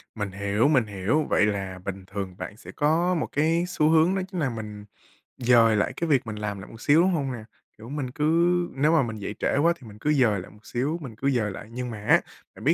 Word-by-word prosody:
Mình 105 -3 -3
hiểu, 100 +5 +1
mình 130 -7 +3
hiểu. 105 +9 0
Vậy - - +4
là 95 -3 -3
bình 95 -1 -5
thường 95 -2 -5
bạn 105 - -7
sẽ - - -11
có 165 +5 +2
một 160 - -1
cái 165 +4 +2
xu 155 -4 +2
hướng 165 +3 +4
đó 190 - 0
chính 180 - -3
là 145 -5 +1
mình 105 -3 -7 0.5
dời 120 -3 +5
lại 105 - 0
cái 170 - -1
việc 135 -5 +2
mình 110 - -4
làm 105 -1 -4
lại 95 - -11
một 115 - -12
xíu, 150 +3 +5
đúng 185 +2 +3
hông 140 -6 -1
nè? 115 -3 -7 0.3
Kiểu, 115 +2 -11
mình 140 -3 -4
cứ 150 +3 -4 0.5
nếu 150 +4 +3
mà 160 - +4
mình 110 -2 -4
dậy 105 0 -5
trễ - - +1
quá 165 +4 +4
thì 125 - -13
mình 105 -1 -12
cứ 150 +6 +1
dời 120 -8 +3
lại - - -12
một 105 +1 -20
xíu, 140 +7 -1
mình 125 -7 -8
cứ 135 +6 0
dời 110 -5 0
lại, 95 - -9
nhưng 125 +1 -4
mà 105 -2 -7
á, - - +5 0.3
bạn - - -12
biết - - +4
120 Hz, 265 wpm, -25 LUFS, 105-150 Hz, 0.5 s, dời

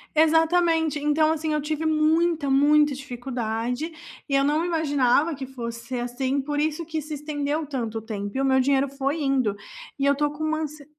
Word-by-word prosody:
Exatamente. 320 0 +3
Então, 305 +2 +2
assim, 315 -1 -1
eu 300 - 0
tive 310 +2 -3
muita, 315 0 +2
muita 295 +2 +4
dificuldade, 245 +1 -4 0.4
e 275 - +1
eu 275 - +4
não 300 +3 +1
imaginava 310 -3 +2
que 270 -2 -6
fosse 235 -2 -7
ser 250 -1 -3
assim, 260 +3 -1
por 290 +2 -2
isso 310 +2 -1
que 315 -1 -3
se 300 +1 -6
estendeu 295 +1 -2
tanto 235 -6 -3
tempo 205 +1 -5
e - - +1
o 275 - +1
meu 265 0 +3
dinheiro 275 +1 +2
foi 275 +3 -2
indo, 265 -7 +1 0.4
e 275 - 0
eu 280 - +5
tô 295 +1 +1
com 295 +1 -6
uma 310 0 0
ansie 300 -1 -6
290 Hz, 190 wpm, -24 LUFS, 265-310 Hz, 0.4 s, eu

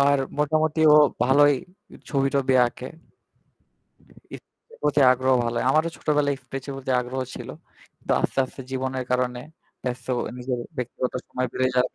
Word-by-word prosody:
আর 140 0 +4 0.2
মোটামুটি 155 +1 +1
ও - - +8 0.3
ভালই 145 +3 +5 0.6
ছবি-টবি 135 -1 +1
আঁকে। 125 +1 -7 1.5
এরপ্রতি 470 - -4
আগ্রহ 130 +1 +1
ভাল 115 - -1
হয়। - - 0
আমারও 155 +3 +2
ছোটবেলায় 145 -2 +1
স্কেচ 135 0 -7
প্রতি 135 -1 -3
আগ্রহ 125 +2 -4
ছিল। - - -8 0.5
কিন্তু - - -2
আস্তে, - - -2
আস্তে 130 +1 -10
জীবনের 130 0 -3
কারণে 125 -1 0 0.4
ব্যস্ত 125 -1 -4 0.3
নিজের 125 0 -3 0.2
ব্যক্তিগত 125 0 -3 0.2
সময় 130 0 -2
বেড়ে 130 0 +1
যাওয়ার 125 0 +1
130 Hz, 135 wpm, -24 LUFS, 125-145 Hz, 1.5 s, ও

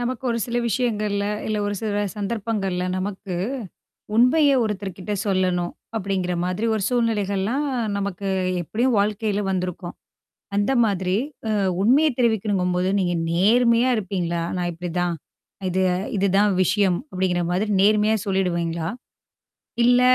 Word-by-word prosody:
நமக்கு 245 +1 -3
ஒரு 235 -1 0
சில 240 0 -3
விஷயங்கள்ல, 210 -3 0 0.2
இல்ல 215 - -1
ஒரு 205 0 -1
சில 205 -2 -1
சந்தர்ப்பங்கள்ல, 200 -3 -2
நமக்கு 190 0 -4 0.8
உண்மைய 275 +6 +5
ஒருத்தர்கிட்ட 195 -2 -4
சொல்லணும் 185 -2 +1 0.2
அப்படிங்கிற 190 -3 -1
மாதிரி 185 +5 -2
ஒரு 215 - -1
சூழ்நிலைகள்லாம் 225 +1 0 0.3
நமக்கு 200 -1 -3 0.3
எப்படியும் 230 - 0
வாழ்க்கையில 210 0 0
வந்திருக்கும். 180 -1 -3 0.6
அந்த 205 +5 +2
மாதிரி, 190 -2 0 0.3
அ - - -1 0.3
உண்மைய 275 +9 +4
தெரிவிக்கணுங்கும்போது 190 -6 +1
நீங்க 175 -2 0 0.2
நேர்மையா 235 +7 +4
இருப்பீங்களா? 180 -5 -2 0.2
"நான் 175 -1 -1
இப்படிதான்? 175 0 -2 0.5
இது 185 +1 +1 0.3
இதுதான் 200 +1 +3
விஷயம்" 185 -1 +2
அப்படிங்கிற 185 -1 0
மாதிரி 195 +4 0
நேர்மையா 210 +1 +4
சொல்லிடுவீங்களா? 170 -4 -1 1.0
இல்ல, 245 +1 +5
200 Hz, 115 wpm, -23 LUFS, 180-220 Hz, 1.0 s, உண்மைய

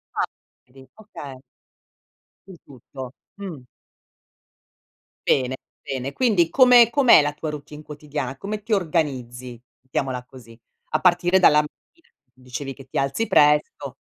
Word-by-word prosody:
A - - +1 0.4
tri 130 +1 -18
okay. 145 -11 -10 1.1
Su 190 - -11
tutto. 130 -1 -10 0.3
Mh. 165 -10 -8 1.6
Bene, 130 -1 +1 0.3
bene. 135 0 -4
Quindi 205 -10 +2
come 250 -3 +6
com'è 255 - +6
la 145 0 -1
tua 155 +1 -5
routine 150 0 -8
quotidiana? 145 -3 -6
Come 205 +6 -5
ti 230 - -10
organizzi, 130 - -2 0.2
mettiamola 130 0 -3
così. 120 -3 -15 0.3
A 155 - 0
partire 175 +1 +3
dalla 150 -5 +6 0.3
mattina, 335 -1 -31 0.3
dicevi 130 +2 -7
che 135 0 -14
ti - - -6
alzi 140 +12 -1
presto. 150 0 +2
145 Hz, 125 wpm, -23 LUFS, 130-185 Hz, 1.6 s, come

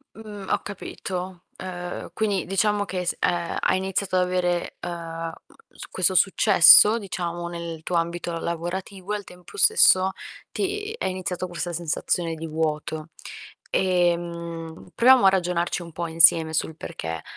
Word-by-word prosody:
Mh. 210 -3 -10
Ho - - +1
capito. 185 -2 -6 0.2
Uhm, 180 -2 -6
quindi 205 -4 -1
diciamo 205 +2 +1
che 185 -2 -4
s 175 - -1
ehm, 175 -1 -1
hai 185 - +2
iniziato 190 0 -2
ad 180 - +3
avere, 180 -1 -1
uhm, - - -3
mhmm, 165 -1 -6 0.4
s - - -9
questo 185 0 +1
successo, 200 +3 +7
diciamo, 175 -4 -5
nel 170 -2 -7
tuo 175 - -2
ambito 170 +1 -2
lavorativo, 180 +4 -5
e - - 0
al 205 - -8
tempo 180 - -14
stesso 190 - +5 0.4
ti 415 +2 -3
è - - -3
iniziato 185 -1 -3
questa 175 0 -4
sensazione 165 0 -2
di 165 +1 -6
vuoto. 155 0 -3 0.6
Ehm, 170 -2 -2
proviamo 250 -4 +6
a - - +9
ragionarci 175 -2 -1
un 170 -1 -11
po' 170 +1 -4
insieme 160 -1 +5
sul 160 0 -2
perché. 80 - -6
175 Hz, 150 wpm, -24 LUFS, 170-190 Hz, 0.6 s, a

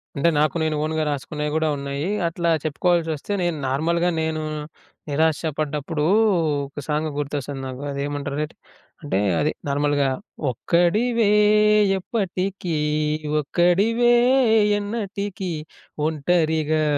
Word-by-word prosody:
అంటే 160 +4 +3
నాకు 155 +2 +2
నేను 155 -1 0
ఓన్‌గా 155 0 -1
రాసుకునేయి 150 +1 -3
గూడా 160 0 +1
ఉన్నాయి. 140 +3 -3 0.2
అట్లా 170 +1 -1
చెప్పుకోవాల్సోస్తే, 160 +2 0
నేను 175 -2 -1
నార్మల్‌గా 170 +6 +1
నేను 160 0 -1 0.7
నిరాశ 155 +1 +1 0.2
పడ్డప్పుడు 150 0 -2 0.6
ఒక 140 - -9
సాంగ్ 155 +1 0
గుర్తొస్తుంది 145 -1 -3
నాకు. 130 +1 -7
అది 140 - -5
ఏమంటారటె? 145 +1 -3 0.5
అంటే 145 -10 -1 0.2
అది 150 - +1 0.2
నార్మల్‌గా 145 0 +1 0.4
ఒక్కడివే 205 - +2 0.7
ఎప్పటికీ 190 -3 -2 0.7
ఒక్కడివే 200 - +3 0.7
ఎన్నటికీ 205 -3 -4 0.6
ఒంటరిగా 155 0 +1
155 Hz, 100 wpm, -23 LUFS, 145-175 Hz, 0.7 s, అంటే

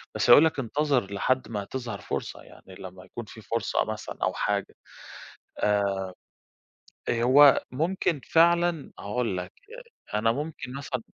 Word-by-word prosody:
بس - - 0
هيقول 155 - +9
لك 155 - 0
انتظر 130 -4 0
لحد 130 +6 0
ما 105 -3 -4
تظهر 125 +1 -6
فرصة. - - -5
يعني 95 - -15
لمّا 90 0 -11
يكون 120 - -8
في 110 +1 -12
فرصة 115 +2 -1
مثلًا 110 0 -6
أو - - +1
حاجة. - - -2 0.8
آآ 100 -2 +1 1.1
آآ 120 -1 +1
هو 140 +3 +7
ممكن 165 +1 -1
فعلًا، 170 -1 +3
هاقول 105 -2 -2
لك 90 - -5 0.6
أ 105 - +1
أنا 115 +1 +2
ممكن 145 -1 -5
مثلًا 130 -3 -4
125 Hz, 145 wpm, -26 LUFS, 105-145 Hz, 1.1 s, هيقول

